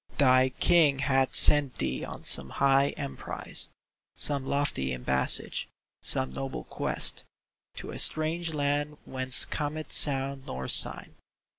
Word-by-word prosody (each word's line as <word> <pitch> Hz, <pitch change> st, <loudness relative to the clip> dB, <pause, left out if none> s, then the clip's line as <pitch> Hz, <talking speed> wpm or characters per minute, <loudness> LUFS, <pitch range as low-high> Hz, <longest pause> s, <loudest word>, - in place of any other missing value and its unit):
Thy 130 Hz, -1 st, +3 dB
King 150 Hz, +1 st, +1 dB
hath 135 Hz, -1 st, -1 dB
sent 145 Hz, -3 st, +6 dB
thee 65 Hz, -, -4 dB
on -, -, -10 dB
some 65 Hz, -, +1 dB
high 140 Hz, -, +1 dB
emprise. 140 Hz, -2 st, -5 dB, 0.5 s
Some 140 Hz, -2 st, +3 dB
lofty 105 Hz, -, -2 dB
embassage, 65 Hz, +1 st, 0 dB, 0.3 s
some 65 Hz, 0 st, 0 dB
noble 65 Hz, -2 st, -7 dB
quest, -, -, -5 dB, 0.5 s
To -, -, -9 dB
a -, -, -3 dB
strange 160 Hz, +2 st, +2 dB
land 145 Hz, +1 st, -3 dB
whence 130 Hz, -1 st, +3 dB
cometh 155 Hz, +1 st, -5 dB
sound 135 Hz, -1 st, +1 dB
nor 65 Hz, +1 st, -7 dB
sign. -, -, +2 dB
135 Hz, 125 wpm, -26 LUFS, 130-145 Hz, 0.5 s, sent